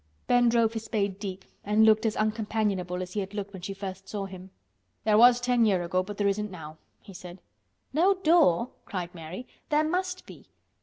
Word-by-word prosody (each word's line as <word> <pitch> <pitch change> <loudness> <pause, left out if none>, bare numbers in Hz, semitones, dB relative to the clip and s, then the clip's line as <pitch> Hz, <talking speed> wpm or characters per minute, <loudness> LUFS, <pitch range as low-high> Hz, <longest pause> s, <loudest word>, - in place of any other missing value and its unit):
Ben 245 -1 +4
drove 230 -1 +2
his 225 -1 -5
spade 200 -4 -2
deep 195 -2 -6 0.2
and 210 +2 +3
looked 220 +1 +4
as 215 - -1
uncompanionable 210 -4 -1
as 180 - -9
he 210 - -1
had 195 +1 -5
looked 200 -1 -5
when 190 - -8
she 195 - -5
first 195 -1 -7
saw 205 -2 -3
him. 190 -1 -10 0.5
"There 215 -1 +3
was 240 +2 +7
ten 245 -1 +2
year' 190 -5 +2
ago, 185 +2 0
but 200 +2 -7
there 205 - +1
isn't 210 +1 -1
now," 160 -4 -10 0.3
he 195 - -12
said. 180 0 -10 0.5
"No 365 +7 +4
door!" 315 - +3
cried 180 -3 -5
Mary. 170 +7 -8 0.2
"There 300 +1 +3
must 365 +2 -2
be." - - -14
205 Hz, 200 wpm, -27 LUFS, 185-230 Hz, 0.5 s, was